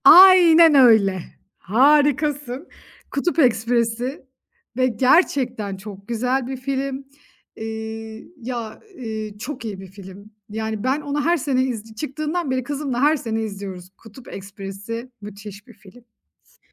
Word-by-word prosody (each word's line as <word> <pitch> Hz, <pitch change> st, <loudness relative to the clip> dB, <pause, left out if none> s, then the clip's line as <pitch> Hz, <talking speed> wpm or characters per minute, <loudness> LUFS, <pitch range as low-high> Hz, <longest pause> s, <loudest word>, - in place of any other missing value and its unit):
Aynen 340 Hz, -4 st, +8 dB
öyle. 215 Hz, -8 st, +5 dB, 0.3 s
Harikasın. 285 Hz, -, +2 dB, 0.4 s
Kutup 335 Hz, +4 st, -1 dB
Ekspresi 240 Hz, +1 st, +1 dB, 0.5 s
ve 255 Hz, 0 st, +3 dB
gerçekten 250 Hz, -, +1 dB
çok 200 Hz, 0 st, -11 dB
güzel 250 Hz, +2 st, -1 dB
bir 265 Hz, 0 st, -4 dB
film. 270 Hz, +1 st, -3 dB, 0.5 s
Iıı, 220 Hz, 0 st, -7 dB
ya, 235 Hz, -3 st, -6 dB, 0.2 s
ııı, 220 Hz, -4 st, -6 dB
çok 250 Hz, +2 st, -7 dB
iyi 205 Hz, -3 st, -5 dB
bir 190 Hz, -, -10 dB
film. 195 Hz, +2 st, -13 dB, 0.2 s
Yani, 220 Hz, 0 st, -4 dB
ben 265 Hz, +4 st, 0 dB
onu 290 Hz, 0 st, -2 dB
her 345 Hz, +1 st, +3 dB
sene 265 Hz, -3 st, 0 dB
iz 225 Hz, -4 st, -5 dB
çıktığından 305 Hz, +4 st, -3 dB
beri 260 Hz, 0 st, -1 dB
kızımla 275 Hz, -2 st, -3 dB
her 300 Hz, +2 st, +4 dB
sene 225 Hz, -4 st, -3 dB
izliyoruz. 195 Hz, -4 st, -7 dB
Kutup 230 Hz, +3 st, -15 dB
Ekspresi 200 Hz, +5 st, -7 dB
müthiş 205 Hz, +1 st, -10 dB
bir 240 Hz, -, -14 dB
film. 210 Hz, +4 st, -18 dB, 0.4 s
S -, -, -30 dB
240 Hz, 130 wpm, -22 LUFS, 215-275 Hz, 0.5 s, Aynen